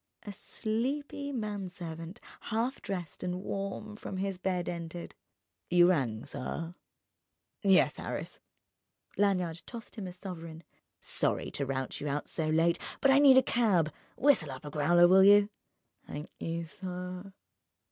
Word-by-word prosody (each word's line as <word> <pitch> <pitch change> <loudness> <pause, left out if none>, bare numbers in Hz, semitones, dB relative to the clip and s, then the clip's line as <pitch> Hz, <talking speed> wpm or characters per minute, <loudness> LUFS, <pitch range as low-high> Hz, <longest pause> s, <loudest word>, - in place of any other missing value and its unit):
A 205 - -6
sleepy 270 +8 -3
manservant, 185 - -5 0.3
half 235 +4 -1
dressed 180 -5 -5
and 180 +1 -3
warm 200 +2 -4
from 195 -2 -6
his 195 -1 -2
bed, 180 -2 -1
entered. 170 0 -5 0.6
"You 175 0 +6
rang, 120 -9 -1
sir?" 165 +6 -5 0.9
"Yes, 195 -4 +4
Harris." - - -5 0.8
Lanyard 180 -5 +1
tossed 235 -1 -9
him 200 -3 -4
a - - -6
sovereign. 170 -3 -8 0.4
"Sorry - - -1
to 140 - -3
rout 130 -1 -3
you 150 - -3
out 145 +1 -2
so 160 -2 -2
late, 165 +2 +3 0.2
but 275 - +5
I 270 - +6
need 275 -2 +8
a 260 - +7
cab. 195 -12 +2 0.2
Whistle 270 - +4
up 130 +2 -8
a 145 - -6
growler, 175 +4 +5
will 190 +2 +7
you?" 205 +1 +7 0.6
"'Nk 150 +1 -6
you, 165 0 -3
sir." 180 +2 -6
180 Hz, 140 wpm, -31 LUFS, 165-205 Hz, 0.9 s, need